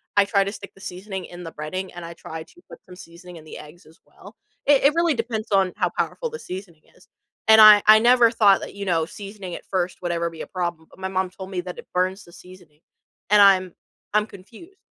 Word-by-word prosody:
I 200 -1 +5
try 200 -1 +2
to 200 - -4
stick 200 -2 -11
the 195 - -18
seasoning 190 0 -7
in 175 0 -11
the 165 - -8
breading 185 +5 -6
and 175 -1 -8
I 170 - -8
try 160 -1 -9
to 350 - -22
put - - -11
some 180 -2 -13
seasoning 175 0 -13
in 155 - -13
the 155 - -11
eggs 155 +3 -14
as 160 - -21
well. - - -16 0.3
It 285 -2 +4
it 285 +2 +5
really 335 -4 +2
depends 225 -2 -4
on 190 -2 +2
how - - 0
powerful 485 - -2
the 465 - -7
seasoning 180 -4 -9
is, - - -23 0.4
and 220 0 +7
I 210 -1 +9
I 215 0 +9
never 240 0 +5
thought 205 -4 +4
that, - - -9
you 200 0 -6
know, 165 -3 +1
seasoning 195 -1 -9
it - - -9
first 185 -1 -2
would 175 - -1
ever 170 0 -1
be 165 -1 -10
a - - -7
problem, 175 -3 -4
but - - -20
my 190 - -3
mom 185 -1 -2
told 190 0 -10
me 180 -2 -3
that 180 0 -9
it - - -12
burns 185 +2 -1
the 170 - -18
seasoning 175 -5 -17 0.5
and 210 -1 +6
I'm 185 -2 +4 0.4
I'm 210 0 +2
confused. 240 - -15
190 Hz, 245 wpm, -23 LUFS, 175-210 Hz, 0.5 s, I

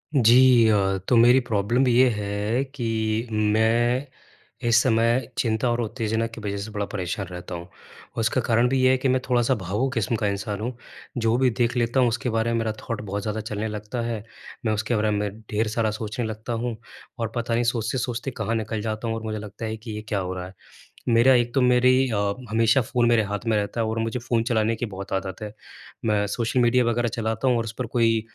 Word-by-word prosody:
जी 125 -1 +6
अ, 95 -2 +2
तो 125 - +3
मेरी 120 +3 +7
प्रॉब्लम 115 +5 +1
ये 125 +1 +5
है 105 +3 -1
कि 115 -2 -1
मैं 115 +5 +2 0.6
इस 115 0 +5
समय 115 0 +2
चिंता 110 +1 +1
और 120 0 0
उत्तेजना 110 0 -1
की 115 0 -10
वज़ह 100 -1 -3
से 110 - -8
बड़ा 105 -1 -2
परेशान 95 0 -3
रहता 90 0 -7
हूँ, 85 - -6
और 95 - -13
उसका 115 +3 +1
कारण 115 +1 +2
भी 135 0 +1
ये 130 - +5
है 130 - +3
कि 130 - -1
मैं 130 0 +2
थोड़ा-सा 125 +1 +3
भावुक 105 +6 -2
किस्म 115 -2 0
का 105 -1 0
इंसान 100 +1 -3
हूँ। 120 +3 -3 0.4
जो 115 -1 +2
भी 130 0 +3
देख 120 +1 0
लेता 120 +2 +1
हूँ 125 - +4
उसके 120 +2 -2
बारे 115 0 0
में 115 - +1
मेरा 115 -1 -1
थॉट 115 - -4
बहुत 100 0 -4
ज़्यादा 110 +1 -3
चलने 105 0 -3
लगता 105 +3 -4
है, 115 -3 -3 0.4
मैं 110 - +2
उसके 110 +3 -1
बारे 110 0 +1
में 105 0 0 0.2
ढेर 110 +1 +1
सारा 110 0 0
सोचने 110 +2 -4
लगता 110 +2 -5
हूँ, 115 0 -2 0.4
और 115 -1 -2
पता 120 -1 -1
नहीं 120 +1 +2
सोचते-सोचते 120 +2 -1
कहाँ 115 - -1
निकल 110 -1 -2
जाता 110 +1 -3
हूँ 115 - -1
और 115 - -6
मुझे 110 -1 -3
लगता 105 +1 -7
है 110 0 -3
कि 110 +1 -9
ये 105 0 -5
क्या 105 - -1
हो 90 -1 -3
रहा 90 -1 -5
है। 95 - -13 0.6
मेरा 120 +3 +5
एक 120 -1 +2
तो 135 - +3
मेरी 125 +1 +4
अ, 110 - -1 0.3
हमेशा 115 +3 +3
फ़ोन 120 +1 +1
मेरे 120 -1 +4
हाथ 105 +1 -4
में 110 -1 +2
रहता 105 +3 -2
है 115 - +1
और 110 +1 -2
मुझे 115 +2 -1
फ़ोन 115 -1 0
चलाने 115 -1 +1
की 120 - -3
बहुत 100 -2 -8
आदत 95 -1 -2
है। 105 -1 -5 0.5
मैं 105 -2 +1
सोशल 115 +4 -1
मीडिया 125 +1 +4
वग़ैरह 120 0 +1
चलाता 110 +2 -1
हूँ 125 - +3
और 115 - -1
उस 115 - -5
पर 125 - -2
कोई 115 -2 +3
115 Hz, 225 wpm, -24 LUFS, 105-120 Hz, 0.6 s, मेरी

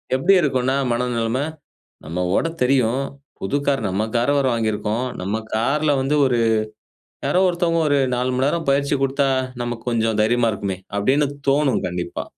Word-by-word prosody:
எப்படி 175 +9 +3
இருக்குன்னா 130 -3 +1 0.2
மனநெலம. 120 0 -1 0.7
நம்ம 90 +3 -2
ஓட்ட 165 - +1
தெரியும், 130 0 +2 0.4
புது 140 +9 -1
கார் 135 -4 +1
நம்ம 100 +4 -1
கார் 120 +5 +2
வேற 135 - +1
வாங்கியிருக்கோம். 110 +2 -1 0.2
நம்ம 110 +4 -2
கார்ல 145 +6 +1
வந்து 145 +3 +1
ஒரு 125 -2 +1 0.9
யாரோ 185 - +2
ஒருத்தவங்க 170 -1 +1
ஒரு 145 -1 +3 0.2
4 125 +1 0
மணிநேரம் 145 +4 0
பயிற்சி 140 +1 +1
குடுத்தா 135 0 +1 0.3
நமக்கு 120 -1 -5
கொஞ்சம் 110 -2 0
தைரியமா 115 +1 +2
இருக்குமே! 100 -2 -3 0.2
அப்படின்னு 135 +8 +2 0.2
தோணும் 140 -3 +2
கண்டிப்பா. 90 -1 -4
125 Hz, 145 wpm, -21 LUFS, 110-140 Hz, 0.9 s, எப்படி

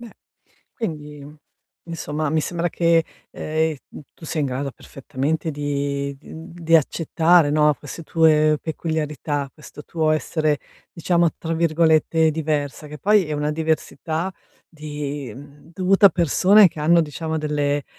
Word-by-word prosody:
Beh, 235 -2 -11 0.6
quindi 150 - -6 0.6
insomma 155 -3 -3
mi 155 0 +1
sembra 175 +2 -2
che, 165 -1 +2 0.3
ehm, 155 0 -1
uhm, - - -10
tu 160 - -15
sia 160 -1 -2
in 140 - +1
grado 135 +1 -3
perfettamente 145 +6 -4
di 140 -1 -3
di, - - -14
uhm, 160 +3 -10
di 165 -1 0
accettare, 165 +1 +3
no, 150 0 +4
queste 150 +4 -9
tue 155 -1 +3
peculiarità, 150 -3 -3
questo 150 -1 -13
tuo 160 -2 0
essere 155 -1 0 0.3
diciamo 170 0 +1
tra 165 0 -4
virgolette 160 -1 +2
"diversa," 150 -1 -3
che 150 0 -9
poi 205 -3 +3
è 155 - -3
una 150 +1 -1
diversità 160 +2 -2 0.4
di, 145 -5 -6
mhmm, 145 +4 -14
dovuta 190 +3 +4
a - - +9
persone 190 +4 +5
che 155 -2 -4
hanno 170 +3 +4
diciamo 160 +1 -3
delle 145 -2 -1
155 Hz, 145 wpm, -22 LUFS, 145-165 Hz, 0.6 s, a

